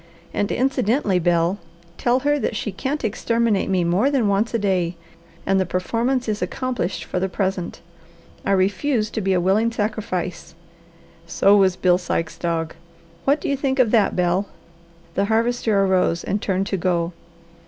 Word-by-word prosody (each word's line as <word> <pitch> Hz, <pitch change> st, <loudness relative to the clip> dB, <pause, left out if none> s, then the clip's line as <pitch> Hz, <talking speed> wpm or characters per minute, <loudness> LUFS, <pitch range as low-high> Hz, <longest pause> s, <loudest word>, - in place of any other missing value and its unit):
And 205 Hz, -, -1 dB
incidentally, 250 Hz, -6 st, +1 dB
Bel, 175 Hz, +2 st, +1 dB, 0.4 s
tell 250 Hz, +2 st, +2 dB
her 290 Hz, +1 st, +1 dB
that 235 Hz, -, -2 dB
she 210 Hz, -, -3 dB
can't 265 Hz, +10 st, -3 dB
exterminate 230 Hz, -1 st, 0 dB
me 185 Hz, -2 st, +2 dB
more 180 Hz, +10 st, +2 dB
than 265 Hz, -7 st, +1 dB
once 200 Hz, +3 st, +1 dB
a 230 Hz, -, +1 dB
day, 185 Hz, -5 st, 0 dB, 0.5 s
and 195 Hz, 0 st, +2 dB
the -, -, +3 dB
performance 235 Hz, +8 st, -1 dB
is 210 Hz, -1 st, -2 dB
accomplished 195 Hz, 0 st, -2 dB
for -, -, -3 dB
the 190 Hz, +1 st, -1 dB
present. 190 Hz, -2 st, -3 dB, 0.6 s
I 195 Hz, -, +1 dB
refuse 210 Hz, +5 st, +1 dB
to 220 Hz, -, -2 dB
be 190 Hz, -1 st, +1 dB
a 180 Hz, -, +2 dB
willing 200 Hz, +6 st, +2 dB
sacrifice. 205 Hz, -7 st, -3 dB, 0.7 s
'So 195 Hz, +4 st, +4 dB
was 190 Hz, -3 st, +4 dB
Bill 180 Hz, -1 st, +3 dB
Sikes' 165 Hz, -2 st, -3 dB
dog!' 165 Hz, -2 st, -2 dB, 0.5 s
What 280 Hz, +3 st, +3 dB
do -, -, -4 dB
you 280 Hz, -, +1 dB
think 270 Hz, -1 st, -1 dB
of 245 Hz, -5 st, +3 dB
that, 215 Hz, -4 st, +3 dB
Bel?" 180 Hz, +2 st, +1 dB, 0.7 s
The 200 Hz, +3 st, +1 dB
Harvester 225 Hz, -2 st, +1 dB
arose 180 Hz, -3 st, +1 dB
and 205 Hz, +1 st, -2 dB
turned 190 Hz, 0 st, 0 dB
to 195 Hz, -, -2 dB
go. 175 Hz, -1 st, 0 dB
200 Hz, 165 wpm, -22 LUFS, 180-230 Hz, 0.7 s, So